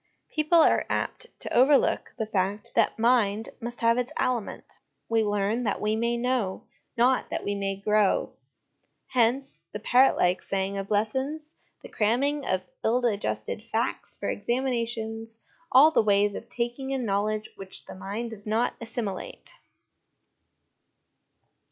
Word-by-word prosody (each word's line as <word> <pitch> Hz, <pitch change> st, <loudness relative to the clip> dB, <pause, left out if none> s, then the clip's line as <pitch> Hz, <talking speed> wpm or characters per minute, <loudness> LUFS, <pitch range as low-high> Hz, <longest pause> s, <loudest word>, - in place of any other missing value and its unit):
People 310 Hz, +2 st, +2 dB
are -, -, +3 dB
apt 480 Hz, -, -2 dB
to -, -, -5 dB
overlook 270 Hz, +3 st, +3 dB
the 220 Hz, -, -1 dB
fact 205 Hz, 0 st, -1 dB
that 230 Hz, -, +2 dB
mind 225 Hz, -2 st, +2 dB
must 240 Hz, +1 st, -7 dB
have 230 Hz, +1 st, +3 dB
its 250 Hz, 0 st, -2 dB
aliment 240 Hz, -5 st, -2 dB, 0.3 s
we 225 Hz, -1 st, +2 dB
learn 205 Hz, +3 st, 0 dB
that 210 Hz, -, -1 dB
we 215 Hz, +1 st, 0 dB
may 235 Hz, +1 st, 0 dB
know, 235 Hz, -6 st, -1 dB, 0.3 s
not 250 Hz, +2 st, +3 dB
that -, -, -3 dB
we 205 Hz, -, -1 dB
may 195 Hz, -1 st, -2 dB
grow; 210 Hz, 0 st, +1 dB, 0.8 s
hence 255 Hz, +2 st, +1 dB
the 210 Hz, -, -4 dB
parrot 250 Hz, +5 st, +4 dB
like 180 Hz, +1 st, +2 dB
saying 195 Hz, 0 st, -2 dB
of 195 Hz, 0 st, -4 dB
lessons, 265 Hz, +9 st, -1 dB, 0.3 s
the -, -, -8 dB
cramming 270 Hz, +7 st, 0 dB
of 185 Hz, 0 st, 0 dB, 0.2 s
ill 235 Hz, +3 st, +3 dB
digested 200 Hz, -, -2 dB
facts 230 Hz, +2 st, -3 dB
for -, -, -4 dB
examinations, 230 Hz, -3 st, -2 dB, 0.3 s
all 285 Hz, +5 st, +8 dB
the -, -, +4 dB
ways 205 Hz, -1 st, +3 dB
of 230 Hz, -, -8 dB
taking 240 Hz, +3 st, -3 dB
in 265 Hz, -3 st, -1 dB
knowledge 210 Hz, +1 st, -1 dB
which 195 Hz, -1 st, -9 dB
the -, -, -9 dB
mind 205 Hz, +5 st, -5 dB
does 210 Hz, -1 st, -10 dB
not 225 Hz, +3 st, +1 dB
assimilate. 225 Hz, -4 st, -5 dB
225 Hz, 145 wpm, -27 LUFS, 205-245 Hz, 0.8 s, all